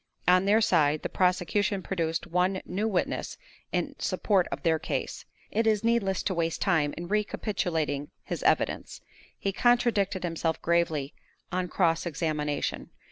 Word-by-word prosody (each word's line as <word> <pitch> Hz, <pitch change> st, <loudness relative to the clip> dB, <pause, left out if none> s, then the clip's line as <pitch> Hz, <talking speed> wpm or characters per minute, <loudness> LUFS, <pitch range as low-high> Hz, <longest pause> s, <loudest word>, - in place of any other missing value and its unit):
On 180 Hz, +1 st, +5 dB
their 210 Hz, +3 st, +4 dB
side, 155 Hz, -7 st, +3 dB
the -, -, -2 dB
prosecution 185 Hz, +2 st, +1 dB
produced 165 Hz, -3 st, -2 dB
one 180 Hz, +2 st, +1 dB
new 200 Hz, +5 st, -1 dB
witness 190 Hz, -5 st, -1 dB, 0.3 s
in -, -, -1 dB
support 195 Hz, -4 st, +1 dB
of -, -, -5 dB
their 160 Hz, -2 st, +2 dB
case. -, -, -4 dB, 0.3 s
It 225 Hz, +1 st, +1 dB
is 215 Hz, -1 st, +2 dB
needless 225 Hz, -5 st, +1 dB
to 190 Hz, -, 0 dB
waste 165 Hz, -2 st, -1 dB
time 160 Hz, -7 st, +1 dB
in 175 Hz, -, -5 dB
recapitulating 175 Hz, -8 st, -1 dB
his -, -, -4 dB
evidence. -, -, 0 dB, 0.4 s
He 195 Hz, -, -2 dB
contradicted 225 Hz, -5 st, +2 dB
himself 165 Hz, -2 st, -1 dB
gravely 160 Hz, -4 st, 0 dB, 0.4 s
on 185 Hz, 0 st, -1 dB
cross 170 Hz, -2 st, +1 dB
examination. 150 Hz, -3 st, -2 dB
180 Hz, 140 wpm, -28 LUFS, 165-200 Hz, 0.4 s, On